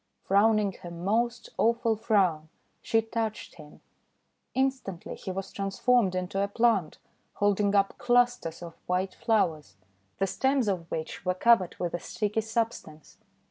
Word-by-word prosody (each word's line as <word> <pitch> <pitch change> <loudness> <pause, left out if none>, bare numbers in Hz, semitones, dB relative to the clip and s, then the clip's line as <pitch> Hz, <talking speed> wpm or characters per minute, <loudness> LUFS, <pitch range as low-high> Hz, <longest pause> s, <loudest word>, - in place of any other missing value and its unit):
Frowning 210 +1 +3
her 175 - -7
most 225 +8 -1
awful 230 0 +2
frown, 190 -8 +1 0.3
she 225 0 +1
touched 225 -1 -4
him. 150 -2 -14 0.7
Instantly 260 -9 -2
he - - -8
was 190 +1 -4
transformed 195 +1 +1
into 185 +2 -2
a 200 - +1
plant 200 -6 +1 0.4
holding 205 0 +1
up 195 0 +2
clusters 245 -9 +1
of 170 -1 -8
white 185 +1 0
flowers, 160 - 0 0.4
the 195 - +1
stems 265 +4 +1
of 175 -4 -2
which 160 0 -5
were 180 0 0
covered 210 -3 +3
with 175 -1 -3
a 175 - -2
sticky 210 +4 -2
substance. 220 -9 -4
200 Hz, 140 wpm, -28 LUFS, 180-230 Hz, 0.7 s, Frowning